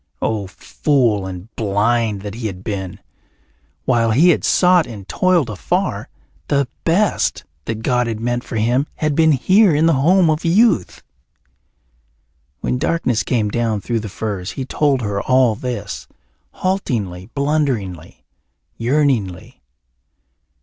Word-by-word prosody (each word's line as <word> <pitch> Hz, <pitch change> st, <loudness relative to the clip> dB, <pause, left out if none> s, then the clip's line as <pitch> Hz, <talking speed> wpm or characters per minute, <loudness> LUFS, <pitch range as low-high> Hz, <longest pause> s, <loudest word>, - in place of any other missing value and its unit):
Oh, 105 Hz, -3 st, -2 dB
fool 110 Hz, 0 st, 0 dB
and 95 Hz, +4 st, -9 dB
blind 105 Hz, 0 st, 0 dB
that 100 Hz, -1 st, -6 dB
he 115 Hz, 0 st, -4 dB
had 95 Hz, -2 st, -8 dB
been! 95 Hz, -4 st, -5 dB, 0.9 s
While 115 Hz, -2 st, +2 dB
he 145 Hz, +11 st, +5 dB
had 170 Hz, -, +2 dB
sought 180 Hz, -2 st, +4 dB
and 100 Hz, -4 st, -9 dB
toiled 180 Hz, -7 st, +2 dB
afar, 105 Hz, -4 st, -2 dB, 0.4 s
the 140 Hz, -2 st, +1 dB, 0.2 s
best 185 Hz, +5 st, +1 dB, 0.2 s
that 110 Hz, -1 st, -4 dB
God 125 Hz, -1 st, +1 dB
had 110 Hz, -2 st, -3 dB
meant 120 Hz, +1 st, -2 dB
for -, -, -7 dB
him 120 Hz, +6 st, +1 dB
had 155 Hz, -1 st, -1 dB
been 160 Hz, +1 st, +4 dB
here 185 Hz, -, +4 dB
in 155 Hz, +2 st, +3 dB
the 165 Hz, -, +4 dB
home 170 Hz, +6 st, +4 dB
of 155 Hz, +1 st, -2 dB
youth. 185 Hz, -, +2 dB, 1.6 s
When 125 Hz, -, -1 dB
darkness 130 Hz, -7 st, 0 dB
came 110 Hz, -3 st, 0 dB
down 115 Hz, -1 st, -1 dB
through 115 Hz, +4 st, -2 dB
the 110 Hz, -1 st, -6 dB
firs 100 Hz, -2 st, -4 dB
he 135 Hz, -, -4 dB
told 140 Hz, -1 st, +1 dB
her 100 Hz, -1 st, -2 dB
all 130 Hz, -3 st, +3 dB
this, 105 Hz, -, -5 dB, 0.4 s
haltingly, 110 Hz, -, -2 dB
blunderingly, 130 Hz, -, -2 dB, 0.5 s
yearningly. 115 Hz, -, -1 dB
120 Hz, 135 wpm, -19 LUFS, 105-150 Hz, 1.6 s, he